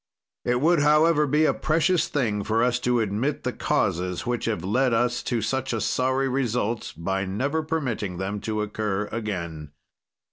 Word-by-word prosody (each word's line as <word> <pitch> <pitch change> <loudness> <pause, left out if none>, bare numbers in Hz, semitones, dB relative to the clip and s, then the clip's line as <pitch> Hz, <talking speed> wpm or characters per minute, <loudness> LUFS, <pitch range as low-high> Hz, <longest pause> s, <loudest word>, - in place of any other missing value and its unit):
"It 125 0 +1
would, 170 +2 +4
however, 150 +1 +4
be 150 +3 +3
a - - +3
precious 165 +3 +1
thing 110 -8 -1
for 110 +3 +1
us 125 -1 +2
to 120 -1 +1
admit 110 +8 -1
the - - -2
causes 90 +1 -1
which 120 -2 -1
have 105 -7 -1
led 120 +5 +2
us 120 +1 +1
to 120 -3 -1
such 135 -1 -1
a 115 - 0
sorry 130 +4 +1
result, 125 -4 -1
by 95 +3 -1
never 135 +12 -1
permitting 130 - -2
them 95 +2 -3
to 110 0 -2
occur 105 -1 -2
again. 85 -9 -4
120 Hz, 170 wpm, -25 LUFS, 105-135 Hz, -, would